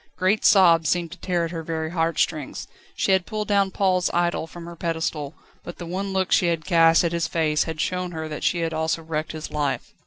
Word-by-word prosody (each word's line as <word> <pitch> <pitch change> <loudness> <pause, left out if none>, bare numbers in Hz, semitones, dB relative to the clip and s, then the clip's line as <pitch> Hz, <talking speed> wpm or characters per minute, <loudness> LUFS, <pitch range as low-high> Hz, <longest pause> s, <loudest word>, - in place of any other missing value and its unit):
Great 190 +3 +1
sobs 165 -5 +5
seemed 175 -2 0
to - - -10
tear 175 -2 0
at 165 - -6
her 165 -2 -4
very 160 0 -3
heart 165 -2 0
strings. 155 -5 -2 0.3
She - - +1
had 190 -2 +2
pulled 215 -1 -3
down 200 -2 +2
Paul's 185 -2 +1
idol 175 -1 0
from 170 +1 -10
her 170 0 -9
pedestal, 160 -3 -3 0.3
but 175 - -8
the 175 - -7
one 190 +3 -3
look 190 -1 -1
she 175 - +4
had 165 -2 -1
cast 165 -2 +5
at 170 - 0
his 170 -1 -1
face 155 -2 +1
had 160 -1 -5
shown 180 +2 -1
her 160 -1 -5
that 150 -1 -6
she 175 - +1
had 165 -1 -1
also 160 +1 -1
wrecked 155 0 -3
his 155 -1 -7
life. 145 -2 -2
170 Hz, 235 wpm, -24 LUFS, 160-180 Hz, 0.3 s, sobs